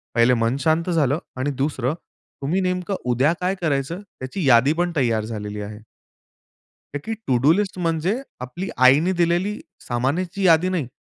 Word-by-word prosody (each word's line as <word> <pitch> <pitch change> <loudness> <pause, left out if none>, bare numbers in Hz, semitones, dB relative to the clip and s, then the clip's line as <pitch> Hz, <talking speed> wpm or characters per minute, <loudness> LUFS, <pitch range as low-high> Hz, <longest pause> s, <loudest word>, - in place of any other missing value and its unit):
पहिले 115 +1 +5
मन 115 +2 +1
शांत 160 +3 +1
झालं 155 -4 +2 0.2
आणि 140 +3 0
दुसरं 135 -2 0 0.5
तुम्ही 170 +8 0
नेमकं 185 +1 -1 0.2
उद्या 135 +7 +3
काय 185 +2 0
करायचं 155 +3 -1
त्याची 160 -4 -5
यादी 130 +4 +5
पण 175 +1 0
तयार 115 -5 +1
झालेली 105 -2 -5
आहे. 105 +1 -7 1.2
ताकी 150 +11 -4
टू 125 -2 +3
डू 145 - +6
लिस्ट 195 0 -1
म्हणजे 170 +8 0 0.2
आपली 175 +10 -6 0.2
आईने 155 +8 +4
दिलेली 175 +6 +1 0.2
सामानाची 165 - -2
यादी 170 +1 +5
नाही. 170 -9 -1
155 Hz, 155 wpm, -22 LUFS, 130-180 Hz, 1.2 s, डू